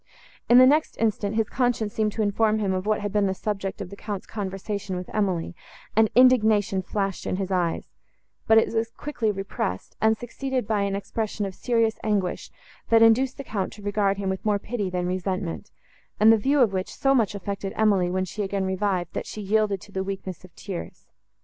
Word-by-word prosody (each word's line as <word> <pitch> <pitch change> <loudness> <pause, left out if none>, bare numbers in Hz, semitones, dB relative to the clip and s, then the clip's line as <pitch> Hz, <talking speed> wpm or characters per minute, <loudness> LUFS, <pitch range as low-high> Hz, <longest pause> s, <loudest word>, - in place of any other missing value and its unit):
In 240 - +8
the 255 - +9
next 300 +4 +2
instant, 215 -2 0
his 220 -1 +1
conscience 240 -4 0
seemed 215 -2 0
to 220 - 0
inform 215 +1 +2
him 200 -3 0
of 185 +2 -3
what 215 -1 +1
had 205 -1 -3
been 205 -1 +2
the 190 - -1
subject 195 -1 -3
of 185 -2 -7
the - - -7
Count's 205 -2 -5
conversation 200 -1 -4
with 180 0 -6
Emily, 185 -5 -1 0.4
and 220 0 +5
indignation 220 -6 +4
flashed 195 +1 -3
in - - 0
his 195 0 -3
eyes; 175 -3 0 0.6
but 220 - +6
it 225 - +3
was 225 0 0
quickly 235 -3 -3
repressed, 195 - -4
and 220 0 +3
succeeded 255 +1 -3
by 215 -2 +1
an 200 0 0
expression 210 +1 -3
of 195 - -5
serious 230 0 0
anguish, 200 -4 -1 0.4
that 225 0 +6
induced 255 +4 +4
the 275 - -6
Count 200 -7 -3
to 210 - -13
regard 205 -1 +1
him 200 -1 -3
with 190 0 -2
more 210 -1 +2
pity 205 -1 -3
than 180 -1 -2
resentment, 185 +1 -3 0.5
and 220 +2 +7
the - - +6
view 270 +6 +2
of 220 -5 +4
which 185 0 -3
so 270 0 +2
much 220 -6 +2
affected 200 0 -4
Emily, 200 -5 +3
when 185 +1 0
she 210 +4 -5
again 195 -1 -1
revived, 190 -2 -1
that - - -4
she - - -7
yielded 205 -1 +1
to 210 - -14
the 190 -1 -2
weakness 190 -1 -6
of 185 - -14
tears. 190 -4 -7
205 Hz, 205 wpm, -25 LUFS, 190-220 Hz, 0.6 s, the